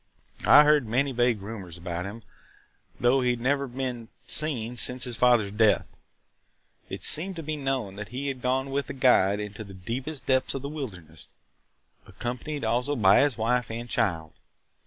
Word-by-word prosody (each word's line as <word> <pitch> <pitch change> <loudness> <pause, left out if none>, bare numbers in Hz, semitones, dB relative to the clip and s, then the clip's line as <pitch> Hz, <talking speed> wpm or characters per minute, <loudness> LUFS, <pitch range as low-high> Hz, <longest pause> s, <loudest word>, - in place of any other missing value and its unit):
I 145 +2 +9
heard 150 -4 +3
many 135 +5 +1
vague 120 -4 +1
rumors 100 -6 -8
about 85 +1 -5
him, 110 +3 -8 0.8
though 125 +2 +3
he 125 - +1
had 120 -1 0
never 140 +3 0
been 125 -2 -5 0.2
seen 125 -6 +1
since 125 +3 +2
his 125 -2 -3
father's 120 -4 +3
death. 105 0 +2 0.9
It - - -7
seemed 185 +5 +3
to 165 - -6
be 155 +1 -3
known 135 -9 -3
that 105 0 -7
he 135 +3 -4
had 135 -2 -4
gone 130 +2 -1
with 140 -1 -2
a - - -4
guide 115 -7 +3
into 105 +1 -6
the 100 -2 -12
deepest 130 +10 -3
depths 130 0 +1
of 135 - -5
the 140 - -4
wilderness, 90 - -8 0.8
accompanied 125 +3 -5
also 125 +6 0
by 100 -6 +5
his 140 -5 +2
wife 120 +2 0
and 115 +1 -6
child. 80 -9 -1
120 Hz, 175 wpm, -26 LUFS, 105-135 Hz, 0.9 s, I